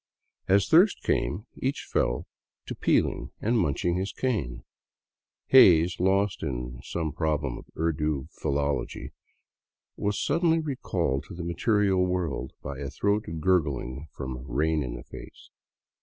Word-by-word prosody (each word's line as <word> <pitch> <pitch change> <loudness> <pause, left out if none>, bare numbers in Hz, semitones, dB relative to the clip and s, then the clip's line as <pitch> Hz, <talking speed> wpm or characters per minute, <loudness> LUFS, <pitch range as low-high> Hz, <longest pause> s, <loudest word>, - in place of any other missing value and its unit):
As 100 +1 +4
thirst 180 - +5
came, 105 +4 0
each 135 +2 -2
fell - - 0 0.4
to - - -5
peeling - - +1
and 115 +2 +1
munching 85 +1 0
his 95 +2 -2
cane. 80 - -2 0.9
Hays, 90 -9 +6
lost 95 +2 +2
in 60 -3 -4
some 80 +2 -3
prob 75 -1 -1
lem 65 -4 -3
of - - -14
Urdu 75 -3 0
philology, 70 0 -2 0.9
was 105 -1 -1
suddenly 165 +2 +2
recalled 95 - -2
to - - -9
the 85 - -5
material 95 +2 +2
world 90 -8 -2
by 70 0 -6
a 70 -1 -4
throat 100 +6 0
gurgle 75 -5 0
from 65 -2 -6
" - - -13
Rain 80 +4 +1
in 60 -3 -4
the - - -8
Face." - - -12
85 Hz, 140 wpm, -27 LUFS, 70-100 Hz, 0.9 s, Hays